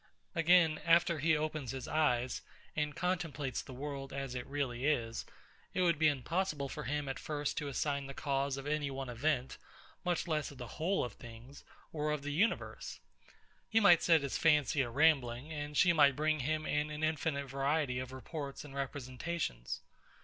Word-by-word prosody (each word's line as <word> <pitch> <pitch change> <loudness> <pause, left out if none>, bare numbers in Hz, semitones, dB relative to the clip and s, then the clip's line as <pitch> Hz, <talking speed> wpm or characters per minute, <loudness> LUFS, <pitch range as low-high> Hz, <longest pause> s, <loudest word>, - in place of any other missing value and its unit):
Again; 165 -2 +5
after 170 -1 +4
he 160 +2 +3
opens 155 -4 -3
his 130 0 -4
eyes, 125 -5 +1 0.3
and 150 -1 -1
contemplates 165 -7 -1
the - - -11
world 135 +1 -5
as 135 -2 -4
it 125 -1 -5
really 135 -4 -2
is, 115 -6 0 0.5
it - - +2
would 170 -4 +3
be 160 - +5
impossible 150 +2 0
for - - -6
him 145 +1 -1
at 135 - -3
first 145 -2 -2
to 145 - -4
assign 140 0 -1
the 135 - -8
cause 140 -1 0
of 135 - -6
any 145 -1 0
one 135 -1 -5
event, 130 +2 -1 0.4
much 175 -1 0
less 155 -2 0
of 140 - -12
the 125 - -6 0.2
whole 190 +4 +2
of 120 - -4
things, 120 +5 -12 0.3
or 150 -1 -1
of 150 -2 -2
the 145 0 -3
universe. 205 +10 -1 0.7
He 225 - +4
might 175 -6 +7
set 165 -3 +5
his 140 - -2
fancy 150 -3 +4
a 125 - -1
rambling; 140 0 +2
and 145 -1 -4
she 175 -2 +6
might 145 -4 +5
bring 155 +1 +1
him 155 +3 -1
in 150 +1 0
an 150 +1 -5
infinite 155 -2 0
variety 135 0 0
of 130 0 -5
reports 140 +2 -6
and 140 - -10
representations. 135 - -3
145 Hz, 180 wpm, -34 LUFS, 135-155 Hz, 0.7 s, might